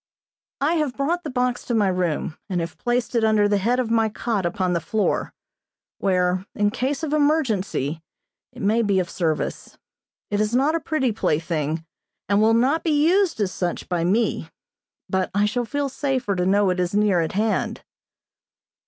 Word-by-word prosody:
I 300 +4 +2
have 295 -5 -1
brought 335 +6 0
the 305 - -4
box 250 -1 -1
to 240 - -1
my 210 -3 +3
room 175 -4 -1
and 180 -2 -1
have 165 -1 -4
placed 245 0 -1
it 235 -2 +2
under 215 -2 +4
the 205 -1 +2
head 240 +6 +1
of 235 -3 -1
my 225 -1 +3
cot 210 -4 -1
upon 180 +1 -1
the 170 - +1
floor, 215 +5 -1 0.7
where, 180 -1 +1
in 205 -1 +2
case 270 +7 -2
of 305 -2 -2
emergency, 220 - +1 0.5
it - - -9
may 220 +4 +3
be 200 -3 +1
of 180 -2 -1
service. 160 -4 -2 0.5
It 205 0 +1
is 215 +2 0
not 280 +5 +3
a 330 - +1
pretty 310 -6 0
plaything, 160 -4 -1 0.4
and 200 +1 +3
will 225 +1 +4
not 265 +7 +2
be 300 -2 +2
used 370 - +2
as 195 -3 0
such 175 -2 -3
by 175 -2 -1
me, 210 +7 0 0.6
but 190 -1 0
I 205 +1 +3
shall 240 +4 -1
feel 285 +4 -1
safer 260 -6 -1
to 180 0 0
know 200 0 +3
it 180 - -2
is 180 +2 -1
near 205 -4 +3
at 160 - -2
hand. 215 +2 -1
210 Hz, 185 wpm, -23 LUFS, 185-255 Hz, 0.7 s, under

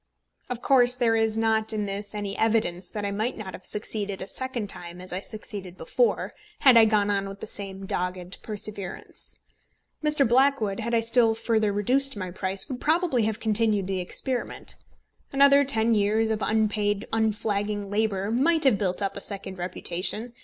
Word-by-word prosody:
Of 245 -1 -5
course 250 -2 +5
there 235 -3 +2
is 225 -1 +1
not 220 0 +1
in 210 -1 -1
this 200 +1 -5
any 205 -1 -3
evidence 215 -6 0
that 210 -1 -4
I 200 - -1
might 215 +5 -2
not 200 -4 -7
have 185 - -10
succeeded 205 -2 -1
a 190 - -6
second 260 0 -3
time 175 -2 -5
as 185 0 -7
I 185 - -1
succeeded 200 -3 -7
before, 485 - 0 0.3
had 260 -4 +7
I 230 -1 +8
gone 210 -2 +2
on 195 -1 -1
with 195 0 -9
the - - -6
same 195 -2 -4
dogged 180 0 -3
perseverance. 205 -3 -5 0.7
Mr. 300 -3 +3
Blackwood, 240 -5 +2
had 235 +1 -1
I 230 - +3
still 230 -1 +3
further 220 -2 +1
reduced 255 +5 +1
my 185 -2 -4
price, 190 +1 -2
would 260 -4 -6
probably 310 -7 +2
have 220 -1 -2
continued 215 -2 +1
the 190 0 -2
experiment. 245 +8 -3 0.6
Another 280 +1 +6
ten 230 -4 +3
years 215 +1 +2
of 220 -1 -1
unpaid 210 -1 0
unflagging 210 -2 -1
labour 205 -1 0
might 310 +7 +2
have 250 -8 +4
built 190 0 0
up 195 0 -2
a 200 - -6
second 190 -2 -5
reputation. 185 +6 -2
215 Hz, 175 wpm, -26 LUFS, 195-230 Hz, 0.7 s, I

